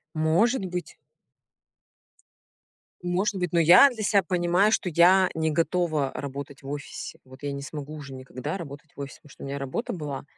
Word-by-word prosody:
Может 185 +9 +2
быть. 180 -2 -5 2.1
Может 180 +4 0
быть, 180 -3 -2
но 170 - +4
я 175 - +8
для 230 -3 -7
себя 200 -1 +3
понимаю, 180 +3 +2
что 195 - +1
я 180 +3 +5
не 160 0 0
готова 160 -3 0
работать 140 0 -6
в 135 - -7
офисе. 145 0 -6
Вот 130 +2 -15
я 145 - -2
не 140 0 -5
смогу 145 +1 -7
уже 145 -3 -8
никогда 130 +5 -5
работать 145 -3 -9
в - - -14
офисе, 140 -1 -7
потому 150 - -18
что - - -12
у - - -5
меня 140 +1 -4
работа 140 - -3
была 150 -6 -5
160 Hz, 180 wpm, -26 LUFS, 140-180 Hz, 2.1 s, я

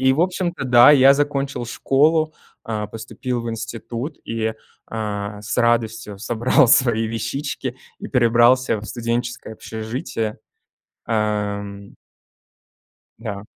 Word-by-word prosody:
И, 130 0 +4
в 145 - 0
общем-то, 175 -4 -1
да, 125 0 +7
я 135 -1 +7
закончил 140 -3 -1
школу, 155 +6 +2 0.3
э, 105 -2 -2
поступил 120 +2 -4
в 115 - -3
институт 115 +5 -6
и, 110 -1 -2 0.4
э, 105 -2 -4
с 105 - -3
радостью 115 -3 0
собрал 120 +2 +2
свои 115 -3 +4
вещички 130 +3 -4 0.2
и - - -7
перебрался 120 -1 +4
в 105 - -9
студенческое 120 0 -3
общежитие. 110 0 -4 0.7
Эм. 105 -2 -2 1.2
Да. 105 -3 -6
115 Hz, 110 wpm, -21 LUFS, 110-130 Hz, 1.2 s, да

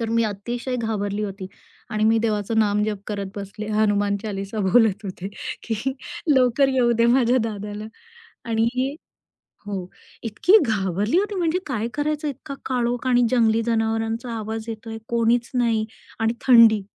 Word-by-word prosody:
तर 230 - -2
मी 230 +1 +2
अतिशय 235 +5 -3
घाबरली 210 -2 -2
होती 195 -1 -6 0.4
आणि 215 0 0
मी 225 +1 +4
देवाचं 220 0 0
नामजप 210 -1 +1
करत 200 -2 -3
बसले 200 +2 -6
हनुमान 205 -1 +2
चालीसा 200 0 -4
बोलत 220 -1 +3
होते, 190 -1 -5 0.3
की 230 +4 -2 0.4
लवकर 260 +1 +4
येऊदे 235 -2 +3
माझ्या 245 0 +4
दादाला 210 -1 -5 0.7
आणि 245 +5 0 0.7
हो. 190 -3 -4 0.4
इतकी 235 - +4
घाबरली 205 - 0
होती, 410 +1 -2
म्हणजे 350 -1 +1
काय 230 -4 -2
करायचं, 300 +1 -1
इतका 275 0 -7
काळोख 245 0 -1
आणि 245 -1 +4
जंगली 230 -2 +3
जनावरांचा 225 +1 -1
आवाज 220 +1 -4
येतोय, 225 0 -6
कोणीच 235 0 +2
नाही 230 -3 +1 0.3
आणि 225 +1 +1
थंडी. 230 -4 +7
225 Hz, 140 wpm, -23 LUFS, 210-245 Hz, 0.7 s, थंडी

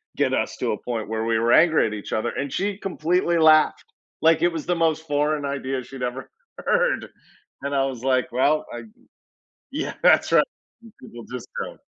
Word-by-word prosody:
get - - +1
us - - -1
to - - -1
a 105 - -2
point 115 -3 -4
where 110 0 -2
we 115 -1 +1
were 115 +1 +2
angry 160 -1 +5
at 105 - -5
each 105 -2 -6
other," 110 +2 0
and 140 -1 -4
she 200 0 -1
completely 175 -2 0
laughed, 155 -1 +5 0.4
like, 160 0 +4
it 175 0 +3
was 160 - -5
the 175 - 0
most 160 -1 +1
foreign 150 0 0
idea 135 -2 -3
she'd 130 0 -8
ever 125 +2 -4 0.3
heard, 485 +1 +1 0.5
and 140 0 -2
I 135 - +2
was 130 -3 -5
like, 130 -2 +1
"Well, 140 +5 +2
I - - -6
g" - - -14 0.8
Yeah, - - -4
that's - - +5
right, - - +5 0.4
and 225 -2 -15
people, 120 -2 -11
just, 125 -1 -7
go. - - -6
140 Hz, 200 wpm, -23 LUFS, 125-165 Hz, 0.8 s, angry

